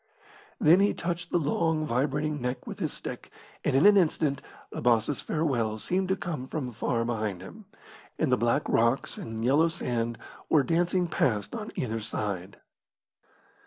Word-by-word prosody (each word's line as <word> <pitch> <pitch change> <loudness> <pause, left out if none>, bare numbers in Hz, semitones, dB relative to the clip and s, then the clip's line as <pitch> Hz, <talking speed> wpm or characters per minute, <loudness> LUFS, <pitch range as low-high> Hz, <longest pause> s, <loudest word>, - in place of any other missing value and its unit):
Then 165 +5 +6
he 200 +1 +3
touched 175 0 -3
the - - +2
long, 160 0 +1
vibrating 145 +3 -1
neck 125 +1 -3
with - - -7
his - - -1
stick, - - -7 0.3
and - - +1
in 140 - +5
an 205 0 +8
instant 155 -5 +1 0.3
Abbas' 120 +3 +1
farewell 125 -9 0
seemed 185 - -1
to 190 - +3
come 155 -7 -5
from 130 -5 -4
far 115 +1 -1
behind 110 -6 -2
him, 210 - -11 0.5
and 155 -5 +1
the - - +6
black 120 +4 +1
rocks 115 +3 +1
and 115 0 -4
yellow 145 +6 +4
sand 120 -7 -2 0.3
were 150 -3 +5
dancing 175 +4 +1
past 110 -10 0
on 220 -2 -5
either 115 -3 -2
side. 100 -3 -4
140 Hz, 160 wpm, -28 LUFS, 115-165 Hz, 0.5 s, an